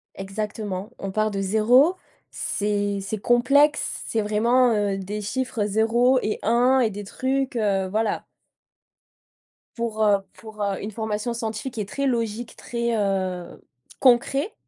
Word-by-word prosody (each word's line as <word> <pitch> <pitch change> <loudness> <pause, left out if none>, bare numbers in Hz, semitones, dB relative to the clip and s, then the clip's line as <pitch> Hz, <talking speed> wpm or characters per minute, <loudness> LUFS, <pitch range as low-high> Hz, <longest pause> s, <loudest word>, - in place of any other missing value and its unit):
exactement. 205 0 -5
On 195 - -4
part 215 +2 +1
de 195 - -3
0, 235 - +4 0.4
c'est 205 -1 -1
c'est 200 +2 -4
complexe, 275 +7 +3
c'est 225 - 0
vraiment, 235 +4 +3
heu, 205 -2 0
des 205 +2 -5
chiffres 230 0 -2
0 230 +5 +3
et 215 - -2
1, 245 +4 +4
et 230 - +2
des 205 0 -7
trucs, 265 +5 -2
heu 195 -3 +1
voilà. 215 +2 -1 1.5
Pour, 225 -2 -1
heu, 205 -1 +4
pour, 215 -2 -8
heu, 200 -1 -2
une 210 - -5
formation 220 +2 -3
scientifique 230 +2 -4
et 210 - -2
très 275 +7 -2
logique, 230 -2 -2
très, 235 -1 -2
heu, 185 -3 -2 0.4
concret, 275 - +3
220 Hz, 140 wpm, -24 LUFS, 205-240 Hz, 1.5 s, 0